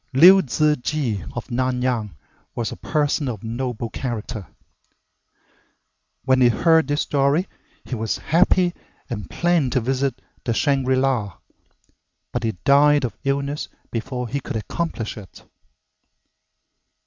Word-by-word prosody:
Liu 180 +8 +8
Ziji 145 - 0
of 120 - -5
Nanyang 125 -5 -1 0.4
was 115 -2 -2
a - - -5
person 150 -1 0
of 110 -5 -6
noble 120 0 -3
character. 115 - -5 1.8
When 130 -1 +3
he 125 - +7
heard 160 +6 +3
this 145 0 0
story 145 +6 +1 0.4
he - - -7
was 110 -2 -1
happy 175 +1 +3 0.4
and 100 -4 -5
planned 170 -7 +1
to 130 - +3
visit 130 +2 -1 0.2
the 115 - -1
Shangri 135 -2 +2
la, 125 - 0 0.9
but - - -2
he 110 -1 0
died 145 0 +5
of 120 - -5
illness 140 +1 -1 0.2
before 125 +2 -3
he 140 +5 -2
could 125 - -6
accomplish 115 0 -3
it. 100 -4 -12
130 Hz, 125 wpm, -22 LUFS, 115-145 Hz, 1.8 s, Liu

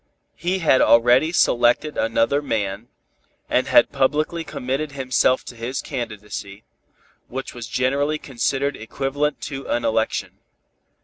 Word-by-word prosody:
He 180 +3 -1
had 130 -4 +5
already 120 +7 +5
selected 120 -1 +2
another 115 +5 +1
man, 110 -4 -3 0.6
and - - +1
had - - +5
publicly 155 +5 0
committed 140 +1 -3
himself 130 -1 +1
to 120 - -9
his 120 +3 -4
candidacy, 105 -5 -6 0.6
which 135 +2 -6
was 120 -2 -7
generally 140 +5 0
considered 140 +1 -1
equivalent 140 +6 -2
to 135 -1 -6
an 120 - 0
election. 110 0 -1
130 Hz, 120 wpm, -22 LUFS, 115-145 Hz, 0.6 s, had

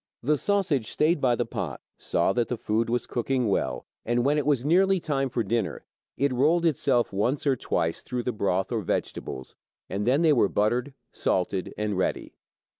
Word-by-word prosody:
The 150 +5 +3
sausage 170 - 0
stayed 155 0 +1
by 125 -2 +3
the - - -1
pot, - - -4 0.2
saw 85 +3 +1
that 120 +1 +1
the 125 - -3
food 110 +2 0
was 120 +1 0
cooking 125 0 -1
well, 100 - -1 0.2
and, 120 +1 0
when 145 +2 +3
it 145 - -2
was 140 -4 +2
nearly 190 +4 +4
time 135 -4 -1
for 120 -1 -1
dinner, 115 -4 -2 0.3
it 140 0 +1
rolled 160 +7 +3
itself 135 -7 +1
once 120 +10 0
or 140 -2 +3
twice 80 -8 -1
through 125 -1 -4
the 125 - -1
broth 95 -3 -1
or 115 -2 0
vegetables 65 -7 -4 0.4
and 105 +3 -2
then 140 +6 +3
they 160 -2 +5
were 115 -7 +3
buttered, 120 +6 0 0.2
salted, 95 0 -1
and 105 -3 -1
ready. - - -2
125 Hz, 190 wpm, -26 LUFS, 110-145 Hz, 0.4 s, they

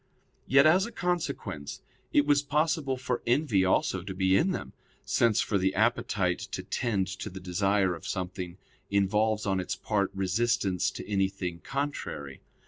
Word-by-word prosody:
Yet, 135 +2 +6
as 185 +6 +5
a - - -9
consequence, 175 - -3 0.3
it 145 - +4
was 145 -1 +4
possible 150 -1 0
for 125 -1 -2
envy 120 -6 +3
also 95 0 +1
to 95 +1 -7
be 95 0 +3
in 175 - +3
them, 185 - -4 0.3
since 115 -3 +3
for 100 - 0
the 95 +1 +1
appetite 105 -5 +1
to - - -5
tend 105 -6 0
to - - -4
the 95 0 -8
desire 95 +1 +1
of 85 - -8
something 90 -1 -4 0.3
involves 105 +2 +1
on 95 -2 +1
its 90 - -2
part 100 -3 0
resistance 95 -1 +1
to - - -8
anything 95 -3 -1
contrary. 135 - -4
100 Hz, 155 wpm, -28 LUFS, 95-130 Hz, 0.3 s, Yet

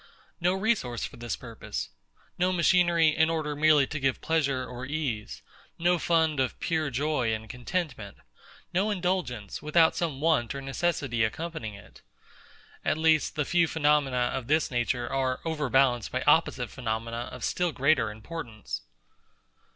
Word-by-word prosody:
No 180 +1 +2
resource 190 - 0
for - - -9
this 120 -3 -3
purpose: 110 - -6 0.5
no 180 +1 +3
machinery, 170 -2 +4
in 160 +1 +3
order 155 -2 -1
merely 150 -1 +5
to 155 - -5
give 130 -2 0
pleasure 140 -5 0
or 125 +1 -8
ease: 120 - -3 0.3
no 175 +1 +2
fund 160 -4 +2
of 130 -1 -1
pure 160 -3 0
joy 135 -3 0
and 110 0 -8
contentment: 125 - -4 0.6
no 195 +4 +2
indulgence, 180 - -2
without 160 +2 +4
some 160 -6 -2
want 145 -7 +1
or 140 - -4
necessity 135 -4 0
accompanying 115 -1 -3
it. 100 -2 -15 0.8
At - - +1
least, 160 -1 +3
the 150 - 0
few 170 +1 +3
phenomena 145 -6 +2
of 125 -3 -4
this 155 0 +2
nature 120 0 0
are 130 -1 -1
overbalanced 135 -7 +2
by 130 +1 -1
opposite 145 -5 +3
phenomena 115 -1 -3
of 125 - -8
still 180 -1 0
greater 135 -5 +2
importance. 110 +1 -7
140 Hz, 145 wpm, -28 LUFS, 120-165 Hz, 0.8 s, merely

